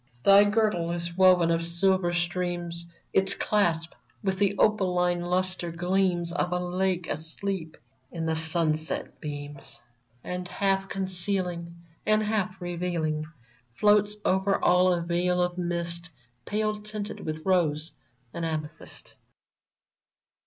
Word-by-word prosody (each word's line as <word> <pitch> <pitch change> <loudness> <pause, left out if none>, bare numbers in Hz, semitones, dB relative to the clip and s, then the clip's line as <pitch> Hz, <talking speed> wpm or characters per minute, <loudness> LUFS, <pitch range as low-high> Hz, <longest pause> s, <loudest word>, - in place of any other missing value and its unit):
Thy 200 +1 +8
girdle 205 -5 +1
is 170 0 -3
woven 180 -2 +5
of 165 0 +1
silver 175 +1 +2
streams; 175 -1 -2 0.3
Its 195 +1 +4
clasp 170 -6 +1 0.3
with 190 -1 0
the 200 -1 +2
opaline 180 -4 +2
lustre 180 0 0
gleams 175 0 0
Of 175 0 -1
a 180 - +1
lake 180 0 -1
asleep 160 +2 -4 0.3
in 165 -1 -4
the 160 0 0
sunset 160 -2 -1
beams; 145 -4 -7 0.4
And, 180 0 -4
half 195 +1 0
concealing 180 -2 -2 0.3
And 215 0 +3
half 200 -3 -1
revealing. 170 -3 -2 0.5
Floats 210 +2 +4
over 190 +1 +2
all 180 +1 +4
a 175 -1 +1
veil 175 +1 +1
of 180 0 0
mist 170 0 -1 0.4
Pale 215 0 -1
tinted 210 0 -5
with 155 0 -5
rose 165 -4 +1 0.4
and 170 - -4
amethyst 155 -1 -5
180 Hz, 120 wpm, -27 LUFS, 170-190 Hz, 0.5 s, Thy